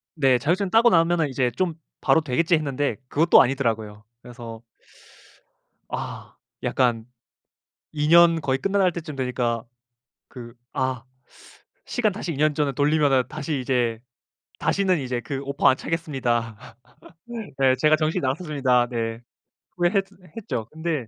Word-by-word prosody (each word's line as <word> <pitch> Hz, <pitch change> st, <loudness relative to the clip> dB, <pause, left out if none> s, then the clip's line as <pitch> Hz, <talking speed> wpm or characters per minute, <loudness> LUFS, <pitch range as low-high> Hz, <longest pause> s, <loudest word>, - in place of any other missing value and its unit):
네. 135 Hz, -4 st, +3 dB
자격증 180 Hz, -, 0 dB
따고 230 Hz, +4 st, +5 dB
나면은 165 Hz, -2 st, +2 dB
이제 125 Hz, -2 st, 0 dB
좀 170 Hz, +7 st, -1 dB, 0.3 s
바로 160 Hz, -, +4 dB
되겠지 155 Hz, +4 st, +1 dB
했는데 145 Hz, -5 st, -1 dB
그것도 160 Hz, +6 st, +5 dB
아니더라고요. 110 Hz, -5 st, -1 dB, 0.2 s
그래서 120 Hz, -2 st, -10 dB, 1.3 s
아. -, -, -6 dB, 0.3 s
약간 120 Hz, -4 st, +1 dB, 0.9 s
2 150 Hz, -1 st, -1 dB
년 170 Hz, -1 st, +6 dB
거의 135 Hz, -2 st, 0 dB
끝나갈 195 Hz, 0 st, +2 dB
때쯤 160 Hz, -4 st, -7 dB
되니까 125 Hz, -3 st, -1 dB, 0.7 s
그 120 Hz, -2 st, -10 dB, 0.2 s
아 130 Hz, -2 st, -2 dB, 0.8 s
시간 225 Hz, -4 st, 0 dB
다시 185 Hz, -4 st, -4 dB
2 140 Hz, -, -7 dB
년 155 Hz, 0 st, +2 dB
전으로 145 Hz, -2 st, 0 dB
돌리면은 145 Hz, -2 st, +2 dB
다시 150 Hz, -2 st, -4 dB
이제 120 Hz, -3 st, 0 dB, 0.6 s
다시는 190 Hz, -3 st, +1 dB
이제 125 Hz, -3 st, -3 dB
그 135 Hz, +2 st, -5 dB
오퍼 140 Hz, +1 st, +1 dB
안 130 Hz, -, +3 dB
차겠습니다. 120 Hz, -10 st, -3 dB, 0.8 s
네 130 Hz, -1 st, +4 dB
제가 155 Hz, 0 st, +5 dB
정신이 155 Hz, 0 st, -1 dB
나갔었습니다. 130 Hz, -4 st, +1 dB
네. 115 Hz, -2 st, -3 dB, 0.6 s
후회했 180 Hz, +3 st, +2 dB, 0.3 s
했죠. 115 Hz, -, -4 dB
근데 155 Hz, -6 st, -3 dB
140 Hz, 280 characters per minute, -24 LUFS, 125-165 Hz, 1.3 s, 년